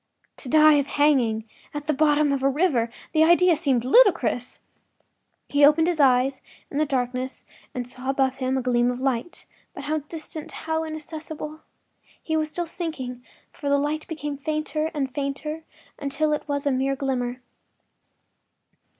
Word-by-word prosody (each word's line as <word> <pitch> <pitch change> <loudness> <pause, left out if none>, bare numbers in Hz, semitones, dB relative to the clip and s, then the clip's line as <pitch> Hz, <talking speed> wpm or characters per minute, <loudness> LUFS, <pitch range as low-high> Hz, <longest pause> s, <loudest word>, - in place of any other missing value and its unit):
To 260 - -6
die 310 0 +6
of 280 - -1
hanging 260 -8 +2 0.3
at 295 0 -4
the 305 - +1
bottom 295 0 +3
of 275 -1 0
a 270 - +3
river!—the 275 -1 +1
idea 345 +1 +5
seemed 275 -6 +1
to - - -5
him - - -3
ludicrous. 340 - +4 0.9
He 285 0 +2
opened 300 +3 +6
his 345 -2 0
eyes 265 -1 +3 0.3
in 285 - -2
the 310 - +2
darkness 255 -1 -2 0.3
and 245 -1 -3
saw 255 +1 -4
above 265 -1 +1
him 260 0 -1
a 260 - -2
gleam 240 -1 +2
of 250 0 -3
light, 265 +5 -2 0.3
but - - -7
how 310 +2 -1
distant, 310 +1 -7
how 320 +2 -2
inaccessible! 310 -1 -7 0.6
He 315 - -3
was 310 -1 0
still 345 +2 -3
sinking, 275 -8 -5 0.3
for 285 - -5
the 280 - +4
light 295 +2 -2
became 295 -3 -4
fainter 305 +1 -2
and 270 -3 -3
fainter 300 +3 -4 0.3
until 295 +2 0
it 300 - -3
was 285 -1 -2
a 285 - +2
mere 270 +1 0
glimmer. 255 -2 -2
285 Hz, 165 wpm, -24 LUFS, 260-310 Hz, 0.9 s, die